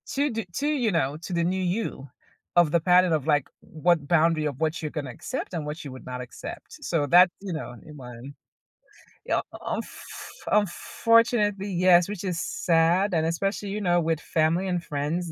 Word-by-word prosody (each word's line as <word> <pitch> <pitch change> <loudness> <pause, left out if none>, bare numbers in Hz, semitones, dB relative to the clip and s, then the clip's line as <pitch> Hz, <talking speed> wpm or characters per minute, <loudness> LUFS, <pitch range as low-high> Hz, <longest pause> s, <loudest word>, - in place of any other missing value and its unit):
To 285 +2 +2
do 225 -2 -3
to, 285 - -1
you 265 -8 +1
know, 150 -4 0
to 185 - -5
the 170 -1 +1
new 185 +2 0
you 180 -6 -2 0.5
of 175 -3 +5
the 170 - +4
pattern 180 +1 +4
of, 155 -2 0
like, 145 -3 +2
what 160 -2 0
boundary 165 -1 +3
of 140 -4 -3
what 160 +1 0
you're 155 - -3
gonna 145 -3 -5
accept 120 - -6
and 160 -4 -3
what 150 +2 -6
you 140 - -7
would 130 - -11
not 125 0 -5
accept, 125 - -9
so 160 -4 0
that, 180 +5 +7
you 195 -2 -5
know, 155 -7 -5
in 150 -1 -11
mind. 125 +1 -10 0.9
Yep, - - 0
unf - - -4 0.7
unfortunately 210 +1 +2
yes, 180 0 +4
which 205 -3 -5
is 180 -3 -2
sad, 175 +3 +2
and 160 -2 +2
especially, 195 +5 -1
you 205 +2 -3
know, 175 -2 +2
with 165 -1 0
family 165 +4 +1
and 180 -2 -1
friends 155 +4 -3
170 Hz, 190 wpm, -26 LUFS, 155-190 Hz, 0.9 s, that